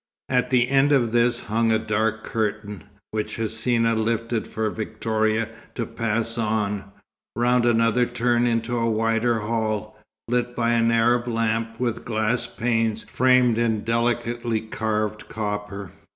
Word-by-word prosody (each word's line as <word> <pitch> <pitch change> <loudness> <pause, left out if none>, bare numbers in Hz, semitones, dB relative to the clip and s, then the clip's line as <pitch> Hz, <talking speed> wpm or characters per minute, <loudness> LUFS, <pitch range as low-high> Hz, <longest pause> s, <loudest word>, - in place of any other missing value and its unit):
At 125 -1 +1
the 125 -2 +3
end 135 +2 +3
of 120 -5 +3
this 120 0 +2
hung 115 +1 +1
a 110 - +4
dark 110 0 -1
curtain, 105 -2 -3 0.3
which 110 -1 -3
Hsina 115 +1 +1
lifted 115 0 -1
for 110 0 -2
Victoria 110 0 -1 0.3
to 115 - -2
pass 115 0 -2
on, 105 -2 -1 0.5
round 120 +1 +2
another 115 +1 +3
turn 120 0 +1
into 115 +1 0
a 115 -1 +1
wider 115 +1 +1
hall, 110 -1 -2 0.3
lit 125 0 -1
by 120 -1 +1
an 115 -1 +3
Arab 120 +1 +2
lamp 115 0 -1
with 120 -2 -2
glass 110 +1 0
panes 115 -2 0
framed 125 -2 +3
in 110 -3 +1
delicately 120 0 0
carved 110 -1 -3
copper. 105 -2 -4
115 Hz, 135 wpm, -24 LUFS, 110-120 Hz, 0.5 s, a